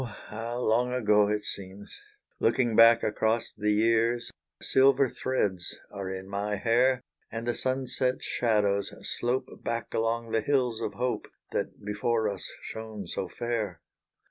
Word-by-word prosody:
how 115 +3 -4
long 125 +1 +2
ago 105 -4 +3
it 105 0 -1
seems, 100 0 -5 0.4
Looking 120 -1 +2
back 115 +1 +7
across 110 +2 +2
the 105 0 -1
year 115 +2 +3 0.4
Silver 135 0 +4
threads 105 -9 -2
are 100 -2 -5
in 95 0 -6
my 100 +1 -2
hair 125 +4 +2 0.3
And 115 0 -4
the 120 - +1
sunset 130 0 0
shadows 105 -4 +1 0.2
slope 125 +2 -2
Back 115 0 -3
along 115 0 -1
the 115 - +2
hills 125 -2 +1
of 105 -3 -3
hope 125 +3 -2 0.2
That - - -4
before 110 +2 0
us 100 -2 -4
shone 110 -3 -6
so - - -3
fair. 110 -7 -3
115 Hz, 140 wpm, -28 LUFS, 105-120 Hz, 0.4 s, back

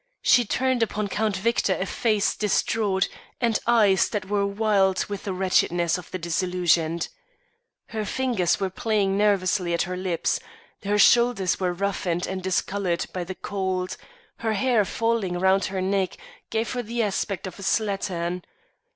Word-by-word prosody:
She 245 -1 +5
turned 260 +3 0
upon 210 -2 -1
Count 210 -1 0
Victor 205 -1 +1
a 190 - -1
face 215 0 +1
distraught 205 -1 +1 0.3
and 235 -3 +1
eyes 215 -5 +4
that 205 -3 -3
were 200 0 0
wild 200 -2 +2
with 200 -1 -6
the 200 - -2
wretchedness 175 -2 +1
of 180 - -12
the - - -4
disillusioned. 170 -1 0 0.8
Her 220 -1 -3
fingers 210 -6 0
were 190 -2 -1
playing 205 -2 0
nervously 190 -3 +2
at - - +1
her 180 +1 -4
lips; 180 -2 -1 0.4
her 205 0 0
shoulders 235 -4 +4
were 180 -2 0
roughened 180 -2 -1
and 190 0 -4
discoloured 190 -1 -1
by 180 - -2
the 185 +2 -6
cold; 190 -2 -3 0.4
her 225 -1 -1
hair 220 0 +2
falling 225 -5 -1
round 190 +1 +3
her 190 -1 -3
neck 190 0 0 0.3
gave 220 0 -1
her 250 - -2
the 235 +1 -2
aspect 200 -1 -2
of 185 +1 -8
a - - -8
slattern. 190 -4 -1
195 Hz, 155 wpm, -25 LUFS, 185-215 Hz, 0.8 s, She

